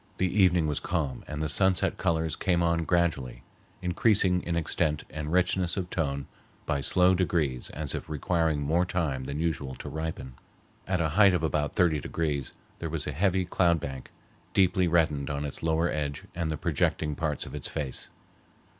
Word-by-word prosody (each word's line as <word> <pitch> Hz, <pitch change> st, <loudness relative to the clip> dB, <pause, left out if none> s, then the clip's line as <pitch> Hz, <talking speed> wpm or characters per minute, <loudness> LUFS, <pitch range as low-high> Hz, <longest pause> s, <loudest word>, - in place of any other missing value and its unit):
The 95 Hz, +2 st, +2 dB
evening 90 Hz, -3 st, +4 dB
was 75 Hz, -1 st, 0 dB
calm 75 Hz, -4 st, -2 dB
and 75 Hz, +1 st, -4 dB
the -, -, 0 dB
sunset 95 Hz, +3 st, +2 dB
colors 80 Hz, -1 st, 0 dB
came 90 Hz, -3 st, +1 dB
on 85 Hz, -1 st, +1 dB
gradually, 80 Hz, -8 st, 0 dB, 0.4 s
increasing 90 Hz, 0 st, +3 dB
in 85 Hz, -, -2 dB
extent 75 Hz, -2 st, 0 dB
and 75 Hz, 0 st, -4 dB
richness 90 Hz, +1 st, +1 dB
of 90 Hz, -2 st, -3 dB
tone 70 Hz, -4 st, -1 dB, 0.4 s
by 70 Hz, -, 0 dB
slow 90 Hz, +5 st, +4 dB
degrees 80 Hz, -8 st, 0 dB
as 75 Hz, -1 st, -3 dB
if -, -, -5 dB
requiring 80 Hz, 0 st, 0 dB
more 80 Hz, +5 st, +2 dB
time 80 Hz, -8 st, -1 dB
than 70 Hz, +2 st, -4 dB
usual 70 Hz, -5 st, -2 dB
to -, -, -7 dB
ripen. 80 Hz, -5 st, -5 dB, 0.5 s
At 90 Hz, -2 st, +1 dB
a 80 Hz, -, +1 dB
height 100 Hz, +3 st, +5 dB
of 85 Hz, -, -1 dB
about 75 Hz, -2 st, 0 dB
thirty 80 Hz, -4 st, +3 dB
degrees 75 Hz, -1 st, -2 dB, 0.3 s
there 85 Hz, -, -3 dB
was 75 Hz, -2 st, -2 dB
a -, -, -2 dB
heavy 95 Hz, +4 st, +1 dB
cloud 85 Hz, -1 st, +2 dB
bank, 65 Hz, -3 st, -6 dB, 0.5 s
deeply 90 Hz, -1 st, +3 dB
reddened 80 Hz, -4 st, +2 dB
on 70 Hz, 0 st, -2 dB
its 70 Hz, -, -4 dB
lower 80 Hz, +1 st, +1 dB
edge 70 Hz, -3 st, -3 dB
and 85 Hz, -2 st, -2 dB
the 80 Hz, -, -2 dB
projecting 75 Hz, 0 st, 0 dB
parts 75 Hz, 0 st, -2 dB
of -, -, -10 dB
its -, -, -4 dB
face. 75 Hz, -5 st, -4 dB
80 Hz, 180 wpm, -28 LUFS, 75-90 Hz, 0.5 s, height